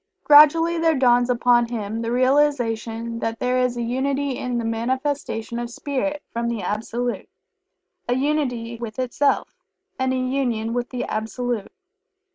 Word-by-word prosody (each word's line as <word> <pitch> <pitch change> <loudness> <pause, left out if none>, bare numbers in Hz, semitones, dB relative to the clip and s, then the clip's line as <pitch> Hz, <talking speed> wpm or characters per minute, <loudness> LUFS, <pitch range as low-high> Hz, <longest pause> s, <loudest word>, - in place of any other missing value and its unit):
Gradually 325 +3 +6
there 325 -1 +3
dawns 245 -1 +4
upon 240 -1 +3
him 225 -1 -4
the 230 0 -2
realization 240 -4 +1
that 225 0 -2
there 250 +1 0
is 250 -1 0
a 240 - -1
Unity 270 +4 -1
in 250 -1 -3
the 235 - -2
manifestation 235 0 -2
of 240 0 -4
Spirit 290 +3 -3
from 235 0 -1
the 230 -3 -3
Absolute 235 +3 -3 0.8
a 245 - +2
unity 250 -5 -1
with 225 -2 -6
itself, 255 +3 0 0.5
and 260 0 +1
a 260 - 0
Union 255 -4 -1
with 245 0 -2
the 250 -1 -3
Absolute. 225 0 -3
245 Hz, 145 wpm, -22 LUFS, 230-270 Hz, 0.8 s, Gradually